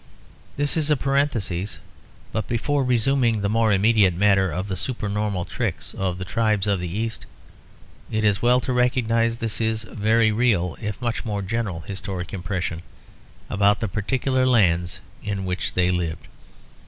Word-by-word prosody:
This 145 Hz, +2 st, +1 dB
is 155 Hz, -1 st, +1 dB
a 150 Hz, -, +4 dB
parenthesis; 115 Hz, -10 st, 0 dB, 0.5 s
but 110 Hz, -, -2 dB
before 140 Hz, +4 st, 0 dB
resuming 125 Hz, -2 st, +2 dB
the 100 Hz, -, 0 dB
more 110 Hz, 0 st, +2 dB
immediate 100 Hz, -2 st, +4 dB
matter 95 Hz, 0 st, +3 dB
of 90 Hz, +5 st, -3 dB
the 95 Hz, -, -2 dB
supernormal 105 Hz, -3 st, -2 dB
tricks -, -, -3 dB
of 95 Hz, -2 st, -2 dB
the 90 Hz, -, -5 dB
tribes 110 Hz, -1 st, +1 dB
of 100 Hz, -2 st, +1 dB
the 90 Hz, -, -3 dB
East, 110 Hz, +5 st, -4 dB, 0.8 s
it 110 Hz, 0 st, -1 dB
is 105 Hz, -1 st, +2 dB
well 125 Hz, +1 st, +4 dB
to 130 Hz, -, -2 dB
recognise 115 Hz, -2 st, +2 dB
this 115 Hz, -2 st, -2 dB, 0.2 s
very 110 Hz, +1 st, +2 dB
real 105 Hz, -6 st, +1 dB
if 105 Hz, -2 st, -4 dB
much 120 Hz, -1 st, -1 dB
more 105 Hz, -4 st, -3 dB
general 100 Hz, -4 st, -2 dB
historic 95 Hz, -1 st, -5 dB
impression 90 Hz, -2 st, -3 dB, 0.7 s
about 100 Hz, 0 st, +3 dB
the 110 Hz, -, -1 dB
particular 130 Hz, +6 st, 0 dB
lands 90 Hz, -6 st, +2 dB, 0.2 s
in 100 Hz, -2 st, -3 dB
which 90 Hz, 0 st, -2 dB
they 90 Hz, 0 st, +3 dB
lived. 85 Hz, -3 st, -2 dB
105 Hz, 155 wpm, -23 LUFS, 95-115 Hz, 0.8 s, a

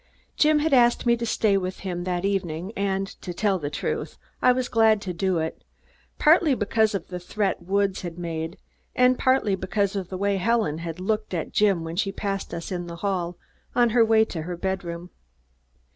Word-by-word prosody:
Jim 305 Hz, 0 st, +4 dB
had 300 Hz, 0 st, +1 dB
asked 240 Hz, -2 st, +4 dB
me 235 Hz, 0 st, +4 dB
to 235 Hz, 0 st, -4 dB
stay 215 Hz, -2 st, +2 dB
with 185 Hz, -1 st, -2 dB
him 175 Hz, -2 st, -4 dB
that 180 Hz, 0 st, -1 dB
evening 185 Hz, -1 st, -2 dB
and, 195 Hz, -1 st, 0 dB, 0.2 s
to 175 Hz, -2 st, -6 dB
tell 200 Hz, -2 st, +1 dB
the 145 Hz, -3 st, -3 dB
truth, -, -, -3 dB, 0.2 s
I 250 Hz, -, +6 dB
was 250 Hz, 0 st, 0 dB
glad 220 Hz, -2 st, +4 dB
to 185 Hz, -2 st, -4 dB
do 185 Hz, +1 st, 0 dB
it, 160 Hz, 0 st, -3 dB, 0.5 s
partly 310 Hz, -2 st, +5 dB
because 220 Hz, -1 st, +1 dB
of 190 Hz, -, -5 dB
the 180 Hz, -1 st, -5 dB
threat 195 Hz, +2 st, -2 dB
Woods 195 Hz, +2 st, 0 dB
had 175 Hz, -2 st, -6 dB
made 165 Hz, -1 st, -4 dB, 0.4 s
and 250 Hz, 0 st, +5 dB
partly 260 Hz, -6 st, +2 dB
because 190 Hz, +1 st, -1 dB
of 190 Hz, -3 st, -3 dB
the 185 Hz, -, -4 dB
way 200 Hz, +1 st, +1 dB
Helen 190 Hz, -6 st, +1 dB, 0.2 s
looked 210 Hz, +1 st, -2 dB
at 165 Hz, -, -3 dB
Jim 200 Hz, -5 st, +3 dB
when 165 Hz, +1 st, -6 dB
she 195 Hz, 0 st, 0 dB
passed 195 Hz, 0 st, -3 dB
us 170 Hz, +2 st, -6 dB
in 175 Hz, -1 st, -3 dB
the 170 Hz, -, -7 dB
hall 180 Hz, -3 st, -1 dB, 0.4 s
on 240 Hz, -1 st, +4 dB
the 230 Hz, +1 st, +4 dB
way 220 Hz, 0 st, +4 dB
to 165 Hz, -6 st, -5 dB
her 175 Hz, +2 st, -5 dB
bedroom. 175 Hz, -2 st, -4 dB
195 Hz, 195 wpm, -25 LUFS, 175-220 Hz, 0.5 s, I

